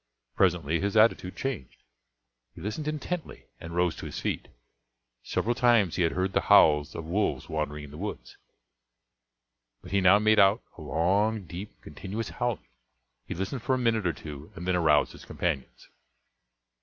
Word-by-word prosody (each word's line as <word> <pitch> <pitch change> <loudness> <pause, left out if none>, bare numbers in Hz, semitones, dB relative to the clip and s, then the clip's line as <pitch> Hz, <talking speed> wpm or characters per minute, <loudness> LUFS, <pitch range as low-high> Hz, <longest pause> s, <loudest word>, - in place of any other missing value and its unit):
Presently 80 +4 +2
his 100 +2 -1
attitude 110 -4 +3
changed, 130 - -5 0.7
he - - -11
listened 110 +9 -4
intently 155 +3 -4
and 85 +1 -8
rose 90 -2 +1
to - - -6
his - - -6
feet. - - -3 0.7
Several 120 - -1
times 120 -8 +3
he - - 0
had 85 - +2
heard 95 +1 -1
the - - +2
howls 75 -1 +5
of 80 - -5
wolves 95 +6 -1
wandering 75 -1 -3
in 75 - -10
the 75 - -10
woods, 105 +2 -6 1.5
but - - -11
he 100 0 +2
now 95 +2 +7
made 110 +1 +4
out 100 +3 +5
a - - -11
long, 100 +6 +1
deep, 90 +5 -9
continuous 105 +3 -6
howling; 120 -2 -3 0.6
he - - -4
listened 95 +8 -3
for 130 - +1
a - - -1
minute 115 -5 +1
or 85 - 0
two 75 0 -9
and 90 +2 -7
then 90 - +2
aroused 80 -4 +3
his - - -13
companions. 75 -7 -4
95 Hz, 170 wpm, -28 LUFS, 80-110 Hz, 1.5 s, now